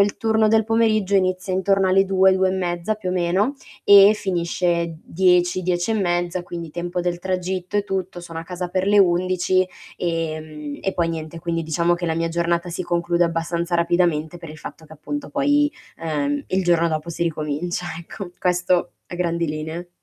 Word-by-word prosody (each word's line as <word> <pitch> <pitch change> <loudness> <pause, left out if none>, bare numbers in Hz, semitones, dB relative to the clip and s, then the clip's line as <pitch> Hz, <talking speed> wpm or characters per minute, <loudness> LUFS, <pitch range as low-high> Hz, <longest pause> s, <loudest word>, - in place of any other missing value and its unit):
il 200 0 +2
turno 220 -1 +2
del 220 0 +3
pomeriggio 215 -3 +2
inizia 185 0 +1
intorno 195 +1 +2
alle 195 +1 +4
2, 190 0 +4
2 190 0 +2
e - - 0
mezza 175 +2 -1
più 205 -4 -4
o - - -1
meno 185 +8 +1 0.3
e 200 +1 +8
finisce 170 -3 -1
10, 180 +1 +2
10 175 +4 0
e - - 0
mezza, 175 -2 0
quindi 170 -2 -7
tempo 175 +2 -3
del 175 0 -2
tragitto 185 +1 -2
e 205 - +1
tutto, 190 -2 -3
sono 165 -1 -8
a - - -4
casa 180 0 -5
per 185 +1 -1
le 205 +1 +4
11, 185 0 +3 0.3
ehm, 155 -3 -4
e 195 - -1
poi 170 -1 +1
niente 160 0 -5
quindi 165 0 -2
diciamo 170 +2 +1
che 175 0 -4
la 160 - 0
mia 165 +1 -1
giornata 170 +1 0
si 175 - -3
conclude 175 0 +1
abbastanza 170 +1 -2
rapidamente 170 -1 +1
per 165 -1 -10
il 155 - -10
fatto 160 - -10
che 155 - -15
appunto 290 - -5
poi, 290 +1 +2 0.3
ehm, 145 -3 -2
il 190 0 0
giorno 170 -1 +3
dopo 155 +1 -3
si 170 - -3
ricomincia 160 +2 -2
ecco, 175 +2 -8
questo 180 0 +1 0.2
a - - -7
grandi 170 -1 0
linee. 160 +3 -5
175 Hz, 190 wpm, -22 LUFS, 170-190 Hz, 0.3 s, e